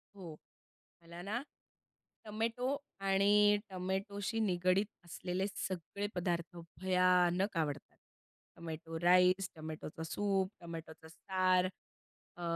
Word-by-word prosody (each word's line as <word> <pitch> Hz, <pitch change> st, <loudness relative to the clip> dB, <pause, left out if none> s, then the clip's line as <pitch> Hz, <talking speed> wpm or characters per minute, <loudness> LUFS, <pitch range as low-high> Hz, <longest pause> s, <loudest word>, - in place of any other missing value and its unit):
हो. 175 Hz, -6 st, -8 dB, 0.7 s
मला 170 Hz, +1 st, -10 dB
ना, 215 Hz, +7 st, -2 dB, 0.8 s
टोमॅटो 225 Hz, +3 st, -2 dB, 0.3 s
आणि 205 Hz, +2 st, +5 dB
टोमॅटोशी 195 Hz, +3 st, -2 dB
निगडीत 185 Hz, 0 st, +2 dB, 0.2 s
असलेले 180 Hz, +2 st, -2 dB
सगळे 195 Hz, 0 st, -4 dB
पदार्थ 175 Hz, -1 st, -2 dB, 0.2 s
भयानक 180 Hz, 0 st, +3 dB
आवडतात. 145 Hz, -3 st, -2 dB, 0.6 s
टोमॅटो 165 Hz, 0 st, -6 dB
राईस, 180 Hz, +2 st, +5 dB
टोमॅटोचा 155 Hz, 0 st, -7 dB
सूप, 195 Hz, +2 st, 0 dB
टोमॅटोचा 165 Hz, -1 st, -8 dB
सार, 185 Hz, +2 st, +2 dB, 0.7 s
अ, 175 Hz, -, -9 dB
185 Hz, 90 wpm, -35 LUFS, 170-195 Hz, 0.8 s, आणि